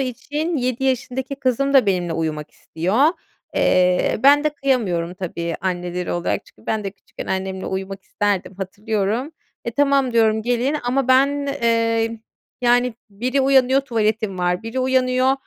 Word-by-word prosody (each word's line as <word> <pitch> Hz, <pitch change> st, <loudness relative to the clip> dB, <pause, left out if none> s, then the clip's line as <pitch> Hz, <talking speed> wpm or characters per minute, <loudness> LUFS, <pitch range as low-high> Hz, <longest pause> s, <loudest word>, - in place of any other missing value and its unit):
için, 295 Hz, +6 st, -2 dB
7 255 Hz, 0 st, -1 dB
yaşındaki 265 Hz, +1 st, -1 dB
kızım 275 Hz, +1 st, 0 dB
da 260 Hz, -6 st, +6 dB
benimle 180 Hz, -3 st, 0 dB
uyumak 155 Hz, -2 st, -3 dB
istiyor. 185 Hz, -, 0 dB, 0.5 s
Eee, 180 Hz, +2 st, +2 dB
ben 290 Hz, +2 st, +6 dB
de 305 Hz, -, +3 dB
kıyamıyorum 200 Hz, -, 0 dB
tabii 170 Hz, -2 st, -4 dB
anneleri 180 Hz, -1 st, -3 dB
olarak. 175 Hz, 0 st, -2 dB
Çünkü -, -, -22 dB
ben 215 Hz, -2 st, -1 dB
de 195 Hz, -, -2 dB
küçükken 195 Hz, -, -11 dB
annemle 190 Hz, 0 st, -3 dB
uyumak 190 Hz, 0 st, -4 dB
isterdim, 200 Hz, -2 st, -2 dB
hatırlıyorum. 210 Hz, -, -2 dB, 0.3 s
"E, 235 Hz, -, -2 dB
tamam," 275 Hz, -1 st, +2 dB
diyorum, 220 Hz, -1 st, +3 dB
"gelin." 245 Hz, +5 st, 0 dB
Αma 260 Hz, +1 st, 0 dB
ben, 280 Hz, +2 st, +3 dB, 0.2 s
eee, 230 Hz, -1 st, +1 dB, 0.4 s
yani 245 Hz, 0 st, +3 dB, 0.2 s
biri 250 Hz, +7 st, -1 dB
uyanıyor, 265 Hz, 0 st, +4 dB
"Τuvaletim 220 Hz, -5 st, -1 dB
var." 180 Hz, 0 st, +1 dB
Βiri 225 Hz, +3 st, -4 dB
uyanıyor, 255 Hz, 0 st, +2 dB
230 Hz, 145 wpm, -21 LUFS, 190-260 Hz, 0.5 s, da